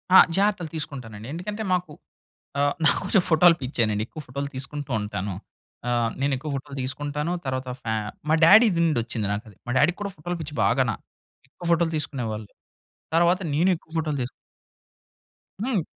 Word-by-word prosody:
ఆ! - - +12 0.2
జాగ్రత్తలు 195 -5 +1
తీసుకుంటానండి. 125 -8 -5
ఎందుకంటే 205 +6 -4
మాకు 180 -3 -1 0.7
ఆ! - - +3 0.2
నాకు - - +4
కొంచెం 190 -1 +3
ఫోటోలు 170 +1 +6
పిచ్చేనండి. 115 -5 0
ఎక్కువ 155 - -8
ఫోటోలు 140 +2 -4
తీసుకుంటూ 140 +2 -5
ఉంటాను. 100 -1 -3 0.6
ఆ! - - +1 0.3
నేను 140 0 +2
ఎక్కువ 150 +4 -6
ఫోటోలు 140 +1 -6
తీసుకుంటాను. 145 +4 -2
తర్వాత 130 -1 -2
ఫ్యా 110 -2 -1 0.3
మా 160 - +5
డ్యాడీ‌ది 205 +1 +7
నుండి 155 -7 +2
వచ్చింది 110 -3 -3
నాకది. 105 -1 -7
మా - - -1
డ్యాడీకి 160 +7 +3
కూడా 200 -1 -2
ఫోటోలు 175 +3 -4
పిచ్చి 150 -1 -6
బాగాన. 115 +4 +3 0.6
ఎక్కువ 175 - -11
ఫోటోలు 170 -1 +3
తీసుకునేవాళ్ళు. 115 -8 -4 0.7
తర్వాత 175 +2 +4
నేను 170 +6 +3
ఎక్కువ 160 - -21
ఫోటోలు 155 -3 0
తీసు 125 - -4 1.3
హ్మ్. 235 -6 +1
145 Hz, 155 wpm, -25 LUFS, 125-170 Hz, 1.3 s, ఆ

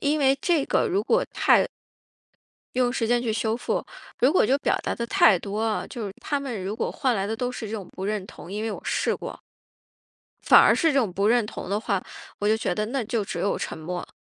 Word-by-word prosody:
因 295 +2 +1
为 270 -1 +4
这 330 -6 +2
个 475 - +1
如 390 +2 +1
果 - - +2
太 - - +4 1.1
用 250 -1 +2
时 230 -3 -1
间 240 +1 +2
去 230 -3 -1
修 220 +1 0
复， 245 - -2 0.3
如 255 +4 +4
果 - - +4
就 265 +6 +2
表 - - +1
达 - - -2
得 235 - -3
太 195 -4 +5
多 200 +4 -4
啊， 225 -1 -1
就 230 -5 -6
是 195 - -6
他 290 - -1
们 240 -9 -5
如 200 +2 -3
果 225 - -2
换 260 -4 0
来 195 -3 -1
的 220 - -2
都 245 +2 -2
是 240 -3 -6
这 - - -7
种 205 -5 -5
不 190 - -6
认 205 -1 -2
同 185 - -12
因 210 +1 -3
为 225 - -1
我 - - -6
试 - - 0
过。 - - -7 1.0
反 - - +8
而 - - +6
是 325 -3 +2
这 275 - +3
种 220 -8 +1
不 200 +3 0
认 235 +1 +4
同 210 - -7
的 205 - +1
话， 200 -4 -1 0.4
我 205 - 0
就 220 - +4
觉 180 - -1
得 210 +3 -1
那 255 +3 -2
就 215 -1 -1
只 - - -5
有 200 - 0
沉 - - -4
默。 175 +3 -5
225 Hz, 265 characters per minute, -25 LUFS, 205-255 Hz, 1.1 s, 反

